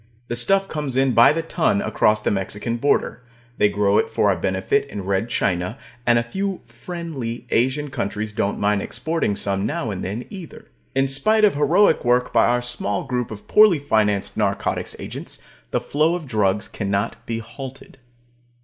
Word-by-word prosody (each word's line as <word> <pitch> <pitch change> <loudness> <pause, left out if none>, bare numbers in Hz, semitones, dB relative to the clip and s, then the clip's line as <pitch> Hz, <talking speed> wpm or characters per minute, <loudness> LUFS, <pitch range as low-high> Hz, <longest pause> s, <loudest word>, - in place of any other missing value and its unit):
The 120 - -1
stuff 195 +11 +3
comes 150 -6 -4
in 135 0 +3
by 115 +1 +7
the 165 +2 -1
ton 175 +5 +1
across 110 - +2
the - - 0
Mexican 105 +4 -2
border; 125 -2 0 0.4
they 105 - +5
grow 100 0 +2
it - - 0
for 100 - +2
our - - +1
benefit 95 +11 0
in 100 -7 -6
Red 100 +4 0
China; 90 +1 -1 0.3
and 120 0 +5
a 120 - +2
few 190 +10 -3
"friendly" 125 -1 -6
Asian 130 +4 +1
countries 110 -4 -3
don't 100 -1 -1
mind 100 0 +1
exporting 160 -8 -1
some 100 0 -1
now 145 -8 -2
and 95 - -5
then, 105 +6 -4
either. 185 -6 -10 0.3
In 135 0 +3
spite 215 +11 +3
of 205 - +3
heroic 160 +6 +3
work 125 0 +2
by 115 - +5
our 120 0 +1
small 120 -5 -2
group 125 -3 -2
of 105 -2 -10
poorly 210 -5 +6
financed 110 -8 +1
narcotics - - -1
agents, - - -6 0.3
the - - 0
flow 155 +4 +1
of 175 -3 -5
drugs 105 -5 0
cannot 100 +1 -2
be 115 - -2
halted. 130 +4 -9
120 Hz, 175 wpm, -22 LUFS, 105-150 Hz, 0.4 s, by